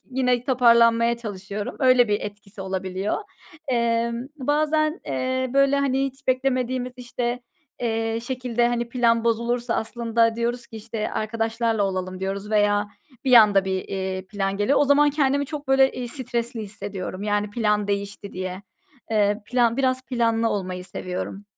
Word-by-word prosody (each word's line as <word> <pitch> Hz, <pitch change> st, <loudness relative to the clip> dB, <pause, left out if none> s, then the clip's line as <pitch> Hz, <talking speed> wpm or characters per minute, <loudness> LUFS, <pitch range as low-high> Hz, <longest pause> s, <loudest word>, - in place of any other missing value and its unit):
yine 250 Hz, -1 st, +1 dB
toparlanmaya 235 Hz, -2 st, +4 dB
çalışıyorum. 205 Hz, -2 st, -6 dB
Öyle 255 Hz, -3 st, +5 dB
bir 205 Hz, 0 st, +1 dB
etkisi 205 Hz, -1 st, -9 dB
olabiliyor. 190 Hz, +1 st, -2 dB, 0.5 s
Emm, 235 Hz, 0 st, 0 dB
bazen, 305 Hz, +3 st, +1 dB
eee, 260 Hz, 0 st, -1 dB
böyle, 275 Hz, 0 st, +4 dB
hani, 270 Hz, -1 st, +1 dB
hiç 275 Hz, +2 st, -10 dB
beklemediğimiz, 255 Hz, -1 st, 0 dB
işte, 245 Hz, 0 st, -3 dB, 0.4 s
eee, 225 Hz, -1 st, -1 dB
şekilde, 245 Hz, -2 st, 0 dB
hani, 240 Hz, 0 st, -1 dB
plan 235 Hz, -1 st, +2 dB
bozulursa 235 Hz, +1 st, 0 dB
aslında, 230 Hz, 0 st, 0 dB
diyoruz 235 Hz, +1 st, -2 dB
ki, 225 Hz, -, -11 dB
işte, 220 Hz, 0 st, -4 dB
arkadaşlarla 225 Hz, 0 st, -1 dB
olalım 185 Hz, -1 st, -2 dB
diyoruz 195 Hz, +2 st, -4 dB
veya 205 Hz, -1 st, +2 dB, 0.4 s
bir 260 Hz, -, +2 dB
anda 205 Hz, -4 st, +7 dB
bir, 190 Hz, -1 st, -2 dB
eee, 190 Hz, -1 st, -3 dB
plan 195 Hz, 0 st, -2 dB
geliyor. 205 Hz, +8 st, +2 dB
O 290 Hz, -, +4 dB
zaman 290 Hz, +1 st, +5 dB
kendimi 285 Hz, -1 st, +1 dB
çok 290 Hz, -2 st, -7 dB
böyle, 270 Hz, 0 st, +5 dB
iii, 245 Hz, -1 st, -5 dB
stresli 240 Hz, -2 st, -3 dB
hissediyorum, 200 Hz, -2 st, -6 dB
yani, 205 Hz, 0 st, 0 dB
plan 210 Hz, -2 st, +1 dB
değişti 200 Hz, 0 st, -3 dB
diye. 185 Hz, +1 st, -5 dB, 0.5 s
Eee, 210 Hz, -1 st, +2 dB
plan 240 Hz, -2 st, +2 dB
biraz, 260 Hz, -1 st, +1 dB
planlı 230 Hz, -2 st, +1 dB
olmayı 185 Hz, -2 st, -3 dB
seviyorum. 185 Hz, +2 st, -5 dB
230 Hz, 145 wpm, -24 LUFS, 205-250 Hz, 0.5 s, anda